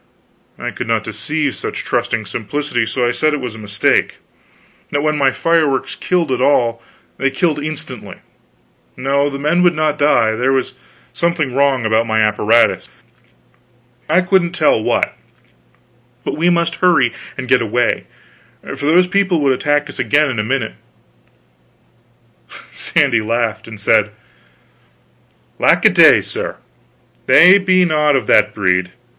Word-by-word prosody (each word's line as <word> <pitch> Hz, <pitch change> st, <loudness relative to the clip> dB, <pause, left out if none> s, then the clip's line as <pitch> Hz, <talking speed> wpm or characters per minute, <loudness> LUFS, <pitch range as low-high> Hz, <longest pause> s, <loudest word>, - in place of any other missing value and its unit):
I -, -, -5 dB
could -, -, -7 dB
not -, -, 0 dB
deceive 150 Hz, -3 st, -3 dB
such -, -, -6 dB
trusting 115 Hz, -2 st, -2 dB
simplicity, 120 Hz, +2 st, -3 dB
so 125 Hz, +1 st, -1 dB
I -, -, +1 dB
said 155 Hz, +4 st, 0 dB
it -, -, -5 dB
was 125 Hz, -4 st, -6 dB
a 110 Hz, -, -11 dB
mistake; 105 Hz, -1 st, 0 dB, 0.7 s
that 145 Hz, 0 st, -2 dB
when 155 Hz, 0 st, 0 dB
my 140 Hz, -2 st, +2 dB
fireworks 155 Hz, -2 st, 0 dB
killed 175 Hz, -6 st, -1 dB
at 125 Hz, -, -1 dB
all, 120 Hz, -4 st, +1 dB, 0.4 s
they 135 Hz, -, 0 dB
killed 150 Hz, +1 st, -1 dB
instantly; 155 Hz, -1 st, -6 dB, 0.8 s
no, 140 Hz, +2 st, 0 dB
the 140 Hz, -, -6 dB
men 150 Hz, +5 st, 0 dB
would 175 Hz, -2 st, +3 dB
not 155 Hz, -1 st, -1 dB
die, 130 Hz, -6 st, +3 dB
there 125 Hz, +4 st, 0 dB
was 130 Hz, -1 st, -1 dB, 0.4 s
something 170 Hz, -6 st, -1 dB
wrong 135 Hz, -3 st, +1 dB
about 110 Hz, +1 st, +1 dB
my 110 Hz, 0 st, 0 dB
apparatus, 110 Hz, +2 st, +2 dB, 1.2 s
I 170 Hz, +4 st, +3 dB
couldn't 185 Hz, -2 st, +1 dB
tell 155 Hz, -9 st, +2 dB
what; -, -, -1 dB, 1.1 s
but -, -, -3 dB
we 170 Hz, +3 st, +1 dB
must 170 Hz, -1 st, 0 dB
hurry 150 Hz, -10 st, +2 dB, 0.2 s
and 130 Hz, -, -6 dB
get 130 Hz, -1 st, +3 dB
away, 115 Hz, +2 st, -1 dB, 0.7 s
for 145 Hz, -, -4 dB
those 175 Hz, +4 st, +4 dB
people 185 Hz, -2 st, 0 dB
would 135 Hz, -2 st, +2 dB
attack 145 Hz, +2 st, 0 dB
us 145 Hz, -, -12 dB
again, 150 Hz, 0 st, +2 dB
in 120 Hz, -, -4 dB
a -, -, 0 dB
minute. 125 Hz, 0 st, -2 dB, 2.0 s
Sandy 125 Hz, -6 st, +1 dB
laughed, 110 Hz, -1 st, -2 dB
and 110 Hz, -2 st, -10 dB
said: 105 Hz, 0 st, +2 dB, 1.5 s
"Lack -, -, +3 dB
a -, -, +7 dB
day, -, -, +6 dB
sir, -, -, -5 dB, 0.7 s
they 180 Hz, +9 st, +7 dB
be 185 Hz, -1 st, +2 dB
not 150 Hz, -3 st, +1 dB
of 135 Hz, -, -1 dB
that 105 Hz, 0 st, +3 dB
breed! 90 Hz, -2 st, 0 dB
140 Hz, 150 wpm, -16 LUFS, 115-155 Hz, 2.0 s, a